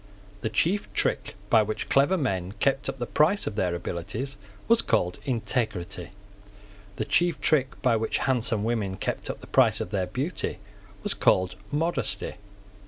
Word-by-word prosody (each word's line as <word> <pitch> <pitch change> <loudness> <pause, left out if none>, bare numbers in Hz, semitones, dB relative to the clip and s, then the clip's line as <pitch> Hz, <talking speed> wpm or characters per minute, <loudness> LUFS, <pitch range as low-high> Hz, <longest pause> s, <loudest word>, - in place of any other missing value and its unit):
The 110 - -1
chief 175 - +1
trick - - 0 0.2
by 115 - +7
which 110 0 -3
clever 145 +8 +4
men 95 - -1
kept 135 +6 +1
up - - -4
the 120 - -2
price 165 - +3
of - - -2
their 90 -4 0
abilities 95 +10 -4 0.3
was 230 0 +5
called 90 -6 +1
integrity. 110 -8 -1 0.9
The 110 - -2
chief 175 +7 +2
trick 135 -4 +1
by 125 -3 +4
which 110 0 0
handsome 115 -5 +1
women 105 -5 -1
kept - - -3
up - - -5
the - - -10
price - - +4
of 90 - -4
their 95 -3 0
beauty 135 - -2 0.5
was - - -1
called 95 0 +3 0.2
modesty. 165 -4 -1
115 Hz, 160 wpm, -27 LUFS, 95-140 Hz, 0.9 s, by